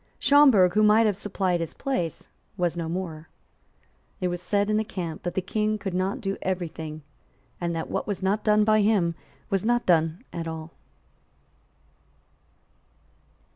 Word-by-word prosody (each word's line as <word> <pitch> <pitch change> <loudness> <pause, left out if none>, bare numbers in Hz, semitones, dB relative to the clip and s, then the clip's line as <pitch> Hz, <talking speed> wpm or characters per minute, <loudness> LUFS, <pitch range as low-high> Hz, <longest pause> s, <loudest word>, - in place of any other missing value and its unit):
Schomberg, 260 -12 +5
who 215 - +3
might 215 +1 +5
have 210 -3 +2
supplied 190 -3 -1
his 165 -2 -4
place, 180 - -2 0.3
was 175 -2 0
no 165 -1 -3
more. 165 -3 -5 0.9
It 180 - 0
was 175 0 -4
said 200 +3 +1
in 215 0 +1
the 215 - +1
camp 170 -6 -5
that 175 - -4
the 190 - 0
King 215 +2 0
could 195 -3 -5
not 190 +7 -1
do 195 -2 -2
every 185 -2 -2
thing, 155 -1 -8 0.6
and 170 -1 -1
that 165 - -3
what - - -3
was 200 -2 -3
not 200 +3 +1
done 210 0 +4
by 215 0 +4
him 200 -5 +2 0.4
was 195 -2 +1
not 240 +2 +1
done 165 +3 +2
at 165 -1 -4
all. 160 0 -6
185 Hz, 165 wpm, -26 LUFS, 170-210 Hz, 0.9 s, Schomberg